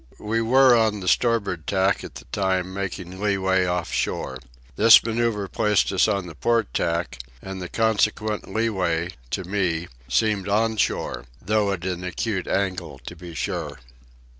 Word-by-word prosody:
We 110 Hz, +2 st, -1 dB
were 130 Hz, +2 st, +6 dB
on 110 Hz, -2 st, +2 dB
the 90 Hz, -, -6 dB
starboard 100 Hz, -7 st, +1 dB
tack 95 Hz, 0 st, +1 dB
at -, -, -9 dB
the -, -, -10 dB
time, 95 Hz, -1 st, 0 dB
making 95 Hz, -1 st, -5 dB
leeway 95 Hz, -2 st, +1 dB
off 90 Hz, -1 st, -2 dB
shore. 65 Hz, -, -2 dB, 0.4 s
This 115 Hz, +2 st, +8 dB
manoeuvre 115 Hz, -3 st, -1 dB
placed 105 Hz, -2 st, +2 dB
us 95 Hz, -, +3 dB
on 100 Hz, -3 st, 0 dB
the 85 Hz, -, -9 dB
port 115 Hz, +7 st, 0 dB
tack, 85 Hz, -4 st, -1 dB, 0.2 s
and 95 Hz, +4 st, -7 dB
the 90 Hz, -, -6 dB
consequent 110 Hz, -1 st, 0 dB
leeway, 90 Hz, -7 st, 0 dB, 0.2 s
to 95 Hz, -, -2 dB
me, 90 Hz, -3 st, -1 dB, 0.2 s
seemed 100 Hz, +9 st, +1 dB
on 110 Hz, +2 st, +1 dB
shore, -, -, -1 dB
though 105 Hz, +1 st, +1 dB
at 90 Hz, -2 st, -4 dB
an 90 Hz, -1 st, -3 dB
acute 90 Hz, +2 st, -3 dB
angle, 95 Hz, -7 st, -2 dB
to 85 Hz, -, -7 dB
be 85 Hz, -1 st, -10 dB
sure. -, -, -3 dB
100 Hz, 160 wpm, -24 LUFS, 90-110 Hz, 0.4 s, This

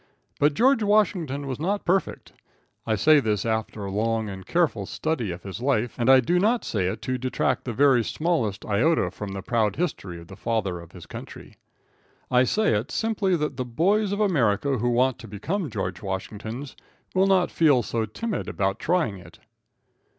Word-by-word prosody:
But 145 Hz, 0 st, +3 dB
George 260 Hz, -, +4 dB
Washington 180 Hz, -9 st, +1 dB
was 135 Hz, -1 st, -4 dB
not 200 Hz, +6 st, -1 dB
perfect. 190 Hz, +2 st, -1 dB, 0.5 s
I 110 Hz, -, +2 dB
say 150 Hz, +9 st, +5 dB
this 105 Hz, -5 st, -1 dB
after 110 Hz, -2 st, -2 dB
a 100 Hz, -, -4 dB
long 110 Hz, +1 st, 0 dB
and 95 Hz, -1 st, -8 dB
careful 145 Hz, -, +1 dB
study 155 Hz, -10 st, -2 dB
of 90 Hz, 0 st, -6 dB
his 100 Hz, +3 st, -7 dB
life, 125 Hz, -4 st, +1 dB
and 120 Hz, +1 st, 0 dB
I 135 Hz, -1 st, +8 dB
do 175 Hz, +9 st, +1 dB
not 225 Hz, +5 st, +2 dB
say 95 Hz, -5 st, -1 dB
it 95 Hz, -, -4 dB
to 130 Hz, 0 st, -2 dB
detract 130 Hz, +1 st, -1 dB
the 125 Hz, -, -2 dB
very 130 Hz, 0 st, +4 dB
smallest 125 Hz, -, -1 dB
iota 125 Hz, +11 st, +2 dB
from 100 Hz, -2 st, -6 dB
the 95 Hz, -1 st, -6 dB
proud 110 Hz, -2 st, +1 dB
history 100 Hz, -, -3 dB
of 85 Hz, -, -12 dB
the 95 Hz, -, -11 dB
Father 100 Hz, -4 st, -2 dB
of 85 Hz, 0 st, -13 dB
his 85 Hz, -3 st, -11 dB
Country. -, -, -10 dB, 0.8 s
I 125 Hz, 0 st, +5 dB
say 215 Hz, -, +2 dB
it 105 Hz, +4 st, -1 dB
simply 215 Hz, -4 st, 0 dB
that 150 Hz, -4 st, -2 dB
the 130 Hz, -, -1 dB
boys 190 Hz, -, +1 dB
of 200 Hz, -, -2 dB
America 140 Hz, -, +2 dB
who 120 Hz, +2 st, +1 dB
want 125 Hz, +1 st, +2 dB
to 115 Hz, -, -10 dB
become 150 Hz, -, -3 dB
George 90 Hz, -4 st, -4 dB
Washingtons 110 Hz, +7 st, -5 dB, 0.4 s
will 190 Hz, +1 st, +3 dB
not 185 Hz, -2 st, +3 dB
feel 145 Hz, -7 st, +4 dB
so 115 Hz, -1 st, -1 dB
timid 220 Hz, -, -4 dB
about 95 Hz, 0 st, -1 dB
trying 160 Hz, -, 0 dB
it. 85 Hz, -2 st, -15 dB
125 Hz, 185 wpm, -25 LUFS, 105-170 Hz, 0.8 s, I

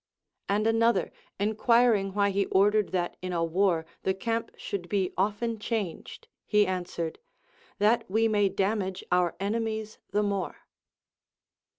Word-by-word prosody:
And 205 Hz, +2 st, +1 dB
an 225 Hz, 0 st, +2 dB
other 230 Hz, -6 st, +2 dB, 0.3 s
enquiring 215 Hz, -1 st, +3 dB
why 200 Hz, -1 st, +3 dB
he 195 Hz, 0 st, 0 dB
ordered 205 Hz, +1 st, +3 dB
that 175 Hz, -2 st, -2 dB
in 185 Hz, 0 st, -4 dB
a 170 Hz, -1 st, +1 dB
Avar 170 Hz, -1 st, +1 dB, 0.2 s
the 190 Hz, -, 0 dB
camp 230 Hz, +3 st, -2 dB
should 175 Hz, -3 st, -5 dB
be 195 Hz, -3 st, 0 dB
often 215 Hz, +4 st, -1 dB
changed, 210 Hz, -6 st, -4 dB, 0.2 s
he 210 Hz, -1 st, +4 dB
answered, 175 Hz, -3 st, -3 dB, 0.6 s
That 215 Hz, +1 st, +2 dB
we 220 Hz, +3 st, +3 dB
may 205 Hz, -2 st, +2 dB
damage 195 Hz, -1 st, -1 dB
our 180 Hz, -2 st, +2 dB
enemies 220 Hz, +1 st, -2 dB
the 205 Hz, +2 st, +1 dB
more. 200 Hz, -3 st, -3 dB
200 Hz, 135 wpm, -28 LUFS, 185-220 Hz, 0.6 s, he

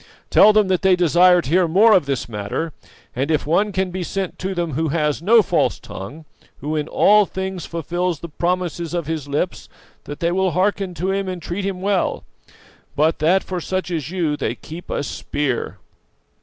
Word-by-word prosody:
Tell 215 Hz, -, +7 dB
them 210 Hz, -1 st, +3 dB
that 185 Hz, -2 st, +1 dB
they 190 Hz, -1 st, +4 dB
desire 180 Hz, +1 st, +4 dB
to -, -, -6 dB
hear 180 Hz, 0 st, +4 dB
more 205 Hz, +7 st, +5 dB
of 175 Hz, -8 st, +3 dB
this 135 Hz, -5 st, -2 dB
matter, 110 Hz, +9 st, -4 dB, 0.4 s
and 135 Hz, +4 st, -1 dB
if 155 Hz, -2 st, +1 dB
one 195 Hz, +7 st, +1 dB
can 190 Hz, -1 st, -1 dB
be 185 Hz, +1 st, -4 dB
sent 190 Hz, +1 st, -4 dB
to 190 Hz, +1 st, -3 dB
them 170 Hz, -3 st, -2 dB
who 160 Hz, +4 st, 0 dB
has 150 Hz, -1 st, 0 dB
no 220 Hz, +5 st, +5 dB
false -, -, 0 dB
tongue; 145 Hz, +12 st, -9 dB, 0.3 s
who 150 Hz, +2 st, -4 dB
in 150 Hz, -1 st, -2 dB
all 210 Hz, -1 st, +4 dB
things 190 Hz, -2 st, -5 dB
fulfills 170 Hz, 0 st, -2 dB
the 170 Hz, -, -7 dB
promises 175 Hz, 0 st, -2 dB
of 170 Hz, -2 st, -2 dB
his 155 Hz, -2 st, -4 dB
lips, 145 Hz, +6 st, -3 dB, 0.4 s
that 145 Hz, -, -7 dB
they 170 Hz, 0 st, 0 dB
will 185 Hz, -1 st, +1 dB
hearken 190 Hz, 0 st, 0 dB
to 185 Hz, +3 st, -1 dB
him 195 Hz, 0 st, -1 dB
and 185 Hz, -1 st, -4 dB
treat 185 Hz, +4 st, -4 dB
him 185 Hz, -2 st, -4 dB
well, 195 Hz, -1 st, 0 dB, 0.7 s
but 155 Hz, +3 st, +2 dB
that 175 Hz, +5 st, +3 dB
for 180 Hz, -2 st, -4 dB
such 185 Hz, +1 st, -3 dB
as 155 Hz, -4 st, -3 dB
you 170 Hz, -5 st, -1 dB
they -, -, -2 dB
keep 165 Hz, +3 st, -10 dB
a -, -, -2 dB
spear. 140 Hz, -2 st, -3 dB
175 Hz, 195 wpm, -20 LUFS, 155-190 Hz, 0.7 s, Tell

